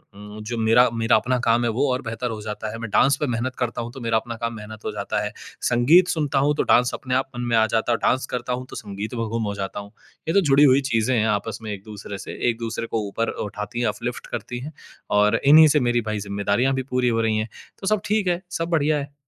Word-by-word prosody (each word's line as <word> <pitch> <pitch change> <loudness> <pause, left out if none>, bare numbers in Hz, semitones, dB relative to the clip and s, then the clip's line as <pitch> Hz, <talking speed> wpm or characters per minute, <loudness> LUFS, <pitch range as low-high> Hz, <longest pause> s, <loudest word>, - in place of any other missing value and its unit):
उम, 105 +1 -10
जो 120 +2 -4
मेरा 115 +3 +5
मेरा 115 +1 +2
अपना 125 0 +1
काम 115 +1 +3
है, 120 - +1
वो 125 +5 +1
और 125 - -2
बेहतर 120 0 -4
हो 110 -1 -6
जाता 105 0 -5
है, 115 - -6
मैं 115 -2 -5
डांस 140 +6 +4
पे 150 - 0
मेहनत 125 +1 -2
करता 120 -2 -2
हूँ, 120 0 -6
तो 135 - -10
मेरा 115 -1 +1
अपना 115 +1 -4
काम 115 0 -2
मेहनत 110 0 -10
हो - - -1
जाता - - -2
है। - - -3 0.4
संगीत 145 +10 +5
सुनता 145 -5 0
हूँ, 145 +2 +3
तो - - +1
डांस 125 0 +4
अपने 130 -1 -3
आप 130 +1 0
मन 120 - -4
में 120 - +2
आ 110 - +5
जाता 110 +2 0
है - - +4
और - - -21
डांस 130 0 0
करता 125 0 -3
हूँ, 125 +1 -4
तो - - -9
संगीत 100 +3 -6
में 115 -1 -1
गुम 115 +1 -2
हो 100 -1 -2
जाता 100 0 -4
हूँ। 100 0 -10 0.4
ये 160 - 0
तो 200 - +5
जुड़ी 140 +2 +6
हुई 135 -1 +6
चीज़ें 115 +3 +2
हैं 110 0 +2
आपस 105 +1 -1
में 110 - -5
एक-दूसरे 100 0 -8
से, - - -8
एक-दूसरे 115 0 -3
को 115 - -1
ऊपर 115 +3 -2 0.2
उठाती 105 +3 -6
हैं, 120 - +1
अपलिफ्ट 120 +3 -4
करती 120 - -5
हैं 145 +5 -8 0.5
और 105 +2 +3
इन्हीं 155 +3 +8
से - - +5
मेरी 120 -2 +1
भाई, 110 -1 -3
ज़िम्मेदारियाँ 100 +6 0
भी 130 0 -1
पूरी 125 -1 +1
हो 115 -1 +1
रही 110 -1 +1
हैं। 110 +1 -2 0.3
तो 195 - -4
सब 215 -2 +2
ठीक 210 -2 +1
है, 175 0 0
सब 165 -1 -3
बढ़िया 155 -2 +2
है। 140 0 -7
120 Hz, 270 wpm, -23 LUFS, 110-130 Hz, 0.5 s, इन्हीं